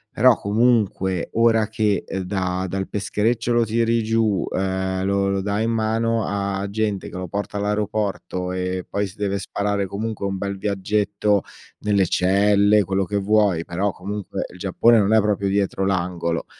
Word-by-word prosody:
però - - +6
comunque 100 -4 +1
ora 115 -1 +3
che, 110 -2 0
uhm, 95 - -3
da 95 -1 -2
dal 95 +1 -3
peschereccio 110 +3 -1
lo 120 -1 +3
tiri 115 +1 +1
giù, 110 -3 +1
uhm, 95 0 -1
lo 100 0 +1
lo 100 0 0
dai 100 +3 -1
in 115 - 0
mano 115 0 0
a 100 -1 -2
gente 105 -2 -2
che - - -8
lo 90 0 -4
porta 100 +3 -4
all'aeroporto 105 -3 -2
e 90 0 -3
poi 100 0 -1
si 95 - -14
deve 100 -1 -1
sparare 100 +1 -1
comunque 105 +1 -4
un 95 0 -2
bel 100 0 -3
viaggetto 100 +1 0 0.4
nelle 100 -3 +2
celle, 100 +3 +3
quello 95 +1 0
che 100 +2 -2
vuoi, 100 -4 +2
però 95 +4 -1
comunque 100 +2 -5
il - - -12
Giappone 100 +5 +3
non 105 +1 +2
è 110 - +6
proprio 100 -2 0
dietro 100 -1 0
l'angolo. 85 -3 -1
100 Hz, 165 wpm, -22 LUFS, 95-105 Hz, 0.4 s, però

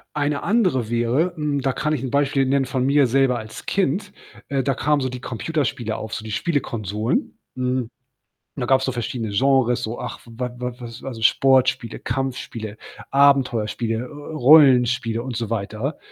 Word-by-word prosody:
Eine 145 -1 -1
andere 180 - +1
wäre, 120 +9 +1
hm, 150 -3 -1
da 135 -1 0
kann 150 +1 -1
ich 135 - -1
'n 130 - -3
Beispiel 140 -1 +2
nennen 135 0 +2
von 130 -1 -1
mir 140 -1 +4
selber 130 0 +2
als 110 0 -9
Kind, 195 +2 0 0.4
äh, 140 -1 0
da 135 -1 0
kamen 145 -1 +1
so 130 - -1
die 125 0 -7
Computerspiele 125 -2 -2
auf, 110 0 -6
so 110 - -4
die 110 - -7
Spielekonsolen. 110 - -2 0.2
Hm, 125 -2 -1 0.7
da 125 -4 -2
gab's 130 +1 +3
so 130 - -1
verschiedene 115 -2 -3
Genres, 130 +1 +2
so, 115 +2 -4
ach, 125 -1 -6
w 115 - -14
wa 125 0 -2
wa 125 0 -4
was 120 -1 -9
also, 120 -4 -6
Sportspiele, 130 0 +3
Kampfspiele, 115 -4 -4 0.3
Abenteuerspiele, 125 -5 +2
äh, - - -2
äh, 145 +5 -9
Rollenspiele 125 -5 +5
und 130 -2 -5
so 115 -3 -3
weiter. 115 +6 -3
130 Hz, 175 wpm, -22 LUFS, 115-140 Hz, 0.7 s, Rollenspiele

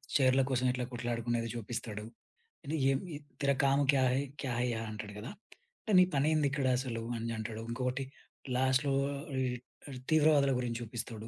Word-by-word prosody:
చైర్ల 130 -1 +5
కోసం 130 0 +1
ఎట్లా 125 0 -2
కొట్లాడుకునేది 120 -1 -1
జూపిస్తాడు. 115 -2 -5 0.8
యే 135 - +5
మీ 180 -3 -7 0.3
'తేరా 140 -1 +3
కామ్ 140 +1 +4
క్యా 135 -2 +4
హై! 130 - +2 0.2
క్యా 135 - -2
హై 125 - +2
యహా' 115 0 -4
అంటాడు 105 -1 -6
గదా! 110 - -6 0.5
అంటే 220 - -3
నీ - - +9
పనేంది 150 +1 +3
ఇక్కడసలు 130 -4 0
అని 115 +1 -3
అంటాడు. 110 0 -4
ఇంకొకటి 125 +2 -1 0.5
లాస్ట్‌లో 130 +2 +2 0.2
అర్ 140 +4 -6 0.6
అర్ 135 - -6
ఈ - - -7
తీవ్రవాదుల 150 -3 +5
గురించి 120 -1 -2
చూపిస్తడు. 115 -1 -6
125 Hz, 160 wpm, -32 LUFS, 115-140 Hz, 0.8 s, నీ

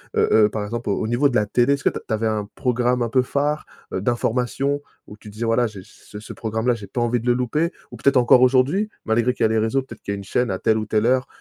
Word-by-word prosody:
Heu - - +3
heu, 105 -1 +5
par 105 -1 -4
exemple, 115 +1 -4
au 100 - 0
au - - -2
niveau 120 +5 +2
de 125 - -4
la 105 - +3
télé, 120 +6 +2
est-ce 140 - -3
que - - +4
t - - -6
tu - - -2
avais 110 +1 -1
un 105 -2 -1
programme 125 0 0
un 115 - -2
peu 130 - +3
phare, 145 +4 -1 0.3
heu, 95 - -2
d'informations? 125 +5 -1 0.2
Où 105 - -12
tu 105 - -13
disais: 105 +3 -5
«Voilà, 115 +1 +2
j'ai 100 -3 -10
j'ai 105 - -13
ce 110 - -10
programme-là, 110 +2 -1
j'ai 105 -3 -10
pas 120 - -3
envie 120 +1 +1
de 115 - -7
le 120 - +5
louper», 140 +8 -1 0.2
ou - - -9
peut-être 140 0 +2
encore 125 0 +6
aujourd'hui? 135 +11 +3 0.2
Malgré 115 +2 +1
qu'il 120 - -2
y - - +5
a - - -3
les 110 - +1
réseaux, 110 +5 +1
peut-être 130 - -12
qu'il 100 - -4
y - - -2
a - - -7
une 100 - -8
chaîne 120 +5 -1
à 95 -1 -2
telle 110 - +2
ou 110 - -2
telle 110 +1 0
heure, 130 +1 +2
120 Hz, 300 wpm, -22 LUFS, 110-125 Hz, 0.3 s, encore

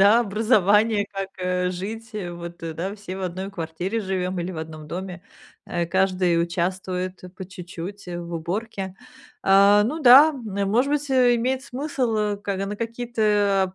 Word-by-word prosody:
да, 205 +4 +7
образования, 210 -1 +3
как, 195 0 -3
э, 180 0 0
жить. 220 +5 -6
Э. 185 -5 -4
Вот, 170 0 -8
да, 165 +4 -4
все 200 -3 -7
в 190 - -6
одной 185 +2 -4
квартире 180 +4 -3
живём 185 -2 -2
или 175 +2 -3
в 165 - -6
одном 155 -1 -7
доме, 180 +2 -6 0.4
э, 170 -1 -1
каждый 185 -2 +2
участвует, 185 +2 -2
э, - - -8
по 190 +1 -9
чуть-чуть, 180 +1 -8
э, 175 -1 -5
в 170 0 -8
уборке. 190 +3 -4 0.5
А, 200 +2 +6
ну 275 +10 -1
да, 275 +3 +9
н 205 -8 -3
может 255 +7 +2
быть, 290 -1 -1
э, 250 -2 +5
имеет 255 +3 0
смысл, 255 -4 -2
э, 210 -1 0
ка 200 -1 -3
на 205 - -4
какие-то 210 -5 0
195 Hz, 170 wpm, -24 LUFS, 180-220 Hz, 0.5 s, да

